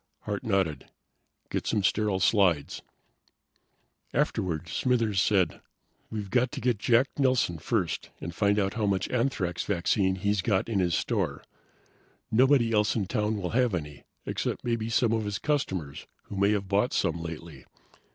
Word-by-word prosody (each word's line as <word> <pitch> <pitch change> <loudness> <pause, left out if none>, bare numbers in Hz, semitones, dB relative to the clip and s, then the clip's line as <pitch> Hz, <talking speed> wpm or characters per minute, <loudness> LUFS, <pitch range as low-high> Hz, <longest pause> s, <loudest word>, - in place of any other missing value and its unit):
Hart 100 -1 -4
nodded. 95 - 0 0.6
"Get - - -2
some 105 -3 +1
sterile 105 0 +1
slides." 90 -6 +2 1.3
Afterward, 85 -2 0
Smithers 115 -1 +1
said, 95 -3 +1 0.5
"We've 105 -3 -5
got 125 +1 +2
to - - -4
get 120 -4 0
Jack 120 +5 +3
Nelson 130 - +2
first - - -1
and 85 - -6
find 100 +3 +2
out 100 -2 +1
how 105 -1 -1
much 95 -1 0
anthrax 115 -9 -1
vaccine 95 0 +1
he's 100 +1 0
got 95 -1 +1
in 110 -4 0
his 90 -3 +1
store. - - -1 0.9
Nobody 125 0 +4
else 105 -1 +2
in 105 -4 0
town 105 +1 -1
will 90 -3 -3
have 120 -4 +2
any, 75 -3 -6 0.2
except - - -3
maybe 115 -2 -1
some 115 0 +2
of 110 -1 0
his 105 -1 -2
customers 95 - -2 0.2
who - - -9
may 100 +1 +3
have 100 -2 -2
bought 100 +6 +1
some 85 +1 0
lately. 85 0 -8
100 Hz, 155 wpm, -28 LUFS, 90-115 Hz, 1.3 s, Nobody